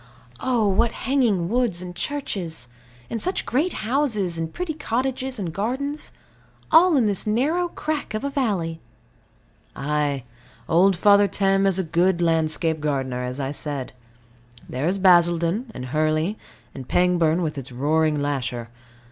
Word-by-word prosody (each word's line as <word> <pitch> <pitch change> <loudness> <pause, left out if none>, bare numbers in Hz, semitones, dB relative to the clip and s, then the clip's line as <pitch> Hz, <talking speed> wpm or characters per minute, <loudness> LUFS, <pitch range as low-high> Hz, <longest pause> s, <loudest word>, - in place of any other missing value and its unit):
Oh, 240 -5 +1
what 200 +4 +2
hanging 235 -10 +1
woods, 235 -4 0
and 175 -1 -8
churches; 180 - -4 0.4
and 230 - -4
such 370 - -1
great 305 +9 +1
houses, 225 -9 0
and 160 0 -3
pretty 360 -3 -3
cottages 260 -1 -2
and 180 -6 -4
gardens 265 - -2 0.6
all 330 0 +6
in 245 - +3
this 205 0 -1
narrow 300 +11 +1
crack 305 -8 -4
of 215 - -3
a 280 - -1
valley! 195 - -1 0.9
Ay. 145 -2 -1 0.4
Old 185 +4 +4
Father 200 +3 +5
Thames 195 0 +2
is - - +2
a 190 - 0
good 170 +2 +1
landscape 160 -1 +1
gardener, 135 -4 -2
as 125 +2 -4
I 135 -1 -2
said. 145 -3 -4 0.7
There 130 +5 -2
is 190 +3 +1
Basildon 175 +4 +3
and 125 - -7
Hurley 155 - 0 0.4
and 130 -2 -8
Pangbourne, 175 -1 +2
with 155 -2 -2
its 135 -2 -7
roaring 150 +4 +1
lasher. 125 -5 -2
180 Hz, 145 wpm, -23 LUFS, 155-240 Hz, 0.9 s, all